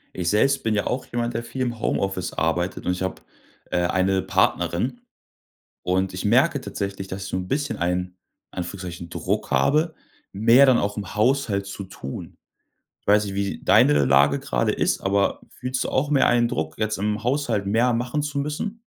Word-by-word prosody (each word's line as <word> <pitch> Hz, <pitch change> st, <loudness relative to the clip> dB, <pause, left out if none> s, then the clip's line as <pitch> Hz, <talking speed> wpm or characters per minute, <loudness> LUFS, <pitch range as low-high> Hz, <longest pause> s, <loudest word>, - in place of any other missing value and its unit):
Ich 90 Hz, -2 st, -1 dB
selbst 135 Hz, +6 st, +2 dB
bin 110 Hz, -1 st, +1 dB
ja 105 Hz, -, 0 dB
auch 125 Hz, -, -2 dB
jemand, 120 Hz, 0 st, -2 dB
der 115 Hz, -, -3 dB
viel 130 Hz, +2 st, -6 dB
im 120 Hz, -2 st, -3 dB
Homeoffice 95 Hz, -4 st, -1 dB
arbeitet 85 Hz, +3 st, -1 dB
und -, -, +1 dB
ich 90 Hz, -, -3 dB
habe, 95 Hz, 0 st, -3 dB, 0.5 s
äh, -, -, +1 dB
eine 95 Hz, +1 st, +1 dB
Partnerin. 120 Hz, -, 0 dB, 0.8 s
Und 95 Hz, +1 st, 0 dB
ich 90 Hz, -, -5 dB
merke 130 Hz, +6 st, +3 dB
tatsächlich, 100 Hz, -4 st, -5 dB
dass 95 Hz, +1 st, -6 dB
ich -, -, -6 dB
so -, -, -2 dB
'n 90 Hz, 0 st, -4 dB
bisschen 145 Hz, +1 st, -1 dB
einen, 90 Hz, +1 st, 0 dB, 0.5 s
in -, -, -6 dB
Anführungszeichen, 85 Hz, -1 st, -6 dB
Druck -, -, -2 dB
habe, 155 Hz, -, +2 dB, 0.4 s
mehr 115 Hz, +7 st, +6 dB
dann 130 Hz, -2 st, +5 dB
auch 105 Hz, -1 st, -1 dB
im 105 Hz, -2 st, -6 dB
Haushalt 110 Hz, -3 st, +1 dB
zu 100 Hz, 0 st, -7 dB
tun. 70 Hz, -7 st, -8 dB, 0.6 s
Ich -, -, -45 dB
weiß 105 Hz, +1 st, +4 dB
nicht, 100 Hz, -1 st, -5 dB
wie 100 Hz, 0 st, -3 dB
deine 75 Hz, -1 st, +5 dB
Lage 70 Hz, +1 st, +4 dB
gerade -, -, 0 dB
ist, -, -, 0 dB
aber 100 Hz, +1 st, +1 dB
fühlst 125 Hz, 0 st, -3 dB
du -, -, -3 dB
auch 140 Hz, +3 st, 0 dB
mehr 140 Hz, -2 st, +4 dB
einen 120 Hz, -1 st, +3 dB
Druck, 80 Hz, -5 st, -3 dB
jetzt 110 Hz, -1 st, 0 dB
im 105 Hz, +2 st, -2 dB
Haushalt 120 Hz, -6 st, 0 dB
mehr 115 Hz, +4 st, +2 dB
machen 125 Hz, +5 st, -1 dB
zu 145 Hz, -1 st, -2 dB
müssen? 155 Hz, +10 st, -4 dB
105 Hz, 190 wpm, -23 LUFS, 95-125 Hz, 0.8 s, mehr